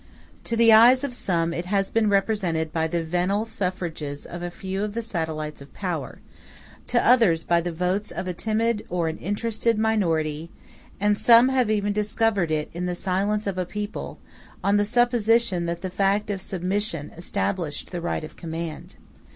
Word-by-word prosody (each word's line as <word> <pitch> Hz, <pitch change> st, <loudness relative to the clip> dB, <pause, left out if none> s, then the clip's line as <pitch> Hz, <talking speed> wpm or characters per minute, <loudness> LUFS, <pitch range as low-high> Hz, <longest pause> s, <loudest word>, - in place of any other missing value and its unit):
To 230 Hz, -, -1 dB
the 230 Hz, -1 st, +6 dB
eyes 245 Hz, +4 st, +7 dB
of 280 Hz, -3 st, -3 dB
some 170 Hz, -7 st, 0 dB
it 170 Hz, -, -3 dB
has 195 Hz, +1 st, 0 dB
been 225 Hz, -2 st, +2 dB
represented 190 Hz, -6 st, 0 dB
by 160 Hz, -1 st, +1 dB
the 170 Hz, +1 st, -1 dB
venal 180 Hz, +6 st, 0 dB
suffrages 175 Hz, -9 st, -4 dB
of 175 Hz, -, -7 dB
a 175 Hz, -, -3 dB
few 190 Hz, +2 st, -5 dB
of 210 Hz, 0 st, -4 dB
the 230 Hz, -, -1 dB
satellites 160 Hz, -7 st, -4 dB
of 140 Hz, -, -14 dB
power; 180 Hz, -5 st, -4 dB, 0.7 s
to 240 Hz, -, +2 dB
others 225 Hz, -10 st, +5 dB
by 170 Hz, 0 st, +2 dB
the 175 Hz, +1 st, -3 dB
votes 180 Hz, +5 st, -1 dB
of 185 Hz, -, -5 dB
a 180 Hz, -, -2 dB
timid 220 Hz, +3 st, 0 dB
or 170 Hz, -2 st, 0 dB
an 160 Hz, -, -6 dB
interested 225 Hz, +3 st, -1 dB
minority; 165 Hz, -8 st, 0 dB, 0.5 s
and 205 Hz, +1 st, +3 dB
some 235 Hz, +4 st, +6 dB
have 255 Hz, -4 st, +2 dB
even 205 Hz, -1 st, +1 dB
discovered 210 Hz, -3 st, +1 dB
it 155 Hz, -1 st, -1 dB
in 180 Hz, +2 st, -3 dB
the 180 Hz, -, -2 dB
silence 200 Hz, +4 st, -1 dB
of 195 Hz, -2 st, -2 dB
a 180 Hz, -, 0 dB
people, 210 Hz, +2 st, -5 dB, 0.5 s
on 200 Hz, +1 st, +3 dB
the 205 Hz, -, +2 dB
supposition 230 Hz, -5 st, +2 dB
that 170 Hz, 0 st, -3 dB
the 185 Hz, -, -4 dB
fact 200 Hz, +2 st, +1 dB
of 195 Hz, -2 st, -4 dB
submission 185 Hz, -3 st, -2 dB
established 150 Hz, -, -3 dB
the 175 Hz, -2 st, -4 dB
right 170 Hz, -, -2 dB
of 155 Hz, -, -9 dB
command. 165 Hz, -1 st, -6 dB
190 Hz, 180 wpm, -24 LUFS, 170-215 Hz, 0.7 s, eyes